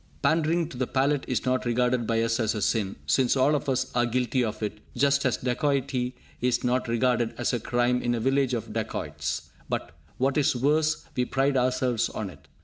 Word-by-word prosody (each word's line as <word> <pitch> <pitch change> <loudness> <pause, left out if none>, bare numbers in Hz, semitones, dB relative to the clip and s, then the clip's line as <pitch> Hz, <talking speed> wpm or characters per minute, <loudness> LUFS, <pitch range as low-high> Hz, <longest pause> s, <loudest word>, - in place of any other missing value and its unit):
Pandering 165 +1 +2
to 130 - -9
the 130 -1 -1
palate 140 +1 +1
is 125 - -1
not 130 0 +1
regarded 120 0 +1
by 115 0 +2
us 115 +1 0
as 110 -1 +1
a 105 - -2
sin, 100 -4 0
since 130 0 +2
all 135 +3 +4
of 145 -1 -1
us 130 0 0
are 120 0 +2
guilty 125 +1 +1
of 110 -1 -3
it, 105 0 -3 0.2
just 140 +1 +3
as 125 - 0
dacoity 130 -1 -1 0.3
is 125 0 +1
not 125 +1 +1
regarded 120 0 +1
as 120 - 0
a 120 - +1
crime 120 +1 +1
in 120 0 0
a - - -2
village 135 +1 +2
of 115 - -5
dacoits; - - -3 0.2
but - - -3 0.3
what 135 +3 +2
is 140 - +2
worse, 150 +5 +1
we 125 - +2
pride 135 +2 +1
ourselves 125 -2 +1
on 100 -3 -5
it! 80 - -18
125 Hz, 205 wpm, -27 LUFS, 120-135 Hz, 0.3 s, all